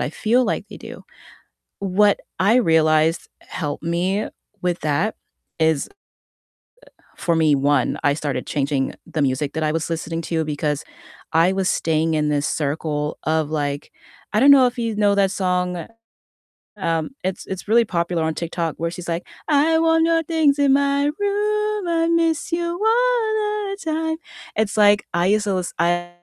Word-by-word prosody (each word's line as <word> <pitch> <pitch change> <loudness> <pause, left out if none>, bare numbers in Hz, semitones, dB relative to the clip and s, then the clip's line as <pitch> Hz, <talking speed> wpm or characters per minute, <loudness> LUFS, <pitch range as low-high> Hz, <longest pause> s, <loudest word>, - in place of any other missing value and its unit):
I - - -1
feel 235 +8 +2
like - - -2
they - - -10
do. - - -11 0.8
What 200 +1 +2 0.2
I 210 +6 +4
realized 160 -5 +3
helped 150 -5 -5
me 185 +5 -1 0.3
with 180 -1 -1
that 155 +8 0 0.5
is, 160 -3 +2 1.1
uh, - - -33
for 170 -3 0
me, 155 -2 +4
1,, 140 -1 +1
I 145 - +3
started 145 -4 -3
changing 140 -2 -1
the 155 - -2
music 135 +2 0
that 160 - -2
I 155 - +1
was 165 0 -2
listening 165 0 -3
to- 160 -1 -1
because 150 0 -2 0.5
I 165 +4 +4
was 190 -1 0
staying 160 0 0
in 150 -1 +1
this 145 +1 0
circle 150 0 -2
of 155 -1 0
like 145 -2 -3 0.4
I 215 - +3
don't 280 - +7
know 260 -2 +7
if 250 +1 -3
you 230 -3 -2
know 205 -1 +3
that 195 -1 +3
song, 180 -3 -1 0.9
um, 165 -4 -1
it's 185 0 -3
it's 190 +1 -6
really 230 +2 +4
popular 170 -2 -1
on 160 0 0
TikTok 170 -1 -3
where 170 +1 -2
she's 180 -1 -8
like, 170 +1 -2 0.2
"I 310 +2 +4
want 325 0 +3
your 330 0 +2
things 310 -3 +2
in 275 -1 +4
my 280 0 +2
room, 420 -1 0
I 330 -1 +1
miss 330 0 +1
you 340 0 0 0.2
all 435 -4 +1
the 395 - -5
time," 320 0 -1 0.4
it's 215 0 -1
like, 205 -1 +5
I 175 +2 +2
used 210 +1 +2
to 200 - 0
lis 180 -1 -3
I 175 0 +1
180 Hz, 170 wpm, -21 LUFS, -, 1.1 s, don't